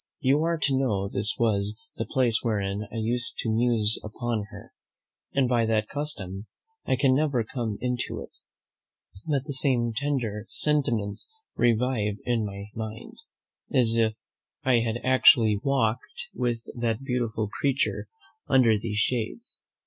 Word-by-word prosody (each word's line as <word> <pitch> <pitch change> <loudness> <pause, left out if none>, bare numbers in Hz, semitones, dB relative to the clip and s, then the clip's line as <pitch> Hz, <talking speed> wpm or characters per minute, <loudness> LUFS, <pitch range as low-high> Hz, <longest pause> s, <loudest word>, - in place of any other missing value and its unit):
You 140 +3 +3
are 170 0 +1
to 140 -3 +1
know 105 -8 0
this 105 +2 -1
was 105 -2 +1 0.2
the - - -3
place 125 -5 +2
wherein 105 -2 -1
I - - -8
used 120 +3 -1
to 115 - -1
muse 110 -2 +2
upon 110 0 -3
her; - - -12 0.6
and 135 -2 +2
by 120 -2 +2
that 110 -1 +1
custom 110 -10 -4 0.4
I - - +3
can 135 0 +3
never 140 -4 +2
come 110 -2 -4
into 125 -1 -2
it, - - -9 1.0
but 140 -4 +1
the 145 - -4
same 125 -4 +2
tender 120 -6 -2
sentiments 130 -8 0 0.3
revive 115 -3 +1
in 120 -2 +1
my 100 0 -6
mind, 110 0 -7 0.6
as 115 -3 +4
if 110 -1 +2 0.5
I 125 -2 +4
had 115 0 -1
actually 115 -5 +5
walked 125 -3 -1
with 120 -2 -1
that 120 0 -1
beautiful 120 -5 -1
creature 135 +4 -1 0.4
under 120 -5 +4
these 105 -1 -3
shades. 125 - -1
115 Hz, 140 wpm, -26 LUFS, 110-130 Hz, 1.0 s, actually